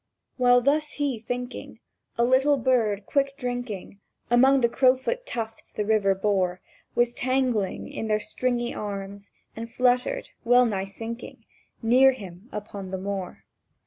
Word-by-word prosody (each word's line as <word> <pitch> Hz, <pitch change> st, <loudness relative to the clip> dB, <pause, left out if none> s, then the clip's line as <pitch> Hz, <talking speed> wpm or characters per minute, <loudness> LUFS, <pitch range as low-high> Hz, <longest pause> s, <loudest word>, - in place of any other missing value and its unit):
While 245 Hz, -1 st, +5 dB
thus 295 Hz, +3 st, +1 dB
he, 280 Hz, -5 st, -1 dB
thinking, 245 Hz, +2 st, -6 dB, 0.4 s
A 235 Hz, -, +3 dB
little 265 Hz, +3 st, +4 dB
bird, 225 Hz, -6 st, +1 dB
quick 275 Hz, +2 st, 0 dB
drinking 245 Hz, -6 st, -5 dB, 0.3 s
Among 265 Hz, +3 st, +5 dB
the 235 Hz, -, +5 dB
crowfoot 260 Hz, -, +1 dB
tufts 225 Hz, -, -5 dB
the 210 Hz, -, -3 dB
river 205 Hz, -2 st, +3 dB
bore, 190 Hz, -2 st, 0 dB, 0.4 s
Was 240 Hz, 0 st, +2 dB
tangled 255 Hz, -6 st, +1 dB, 0.2 s
in 220 Hz, -, -5 dB
their 215 Hz, 0 st, +2 dB
stringy 240 Hz, +1 st, -2 dB
arms, 200 Hz, -1 st, -6 dB, 0.3 s
and 230 Hz, +1 st, -6 dB
fluttered, 250 Hz, +1 st, +1 dB
well 245 Hz, +1 st, +5 dB
nigh 195 Hz, -4 st, -1 dB
sinking, 225 Hz, +4 st, -8 dB, 0.4 s
Near 260 Hz, +4 st, +6 dB
him, 195 Hz, -2 st, -11 dB
upon 205 Hz, -2 st, -6 dB
the 190 Hz, -, -3 dB
moor. 190 Hz, -1 st, -5 dB
235 Hz, 140 wpm, -26 LUFS, 205-255 Hz, 0.4 s, Near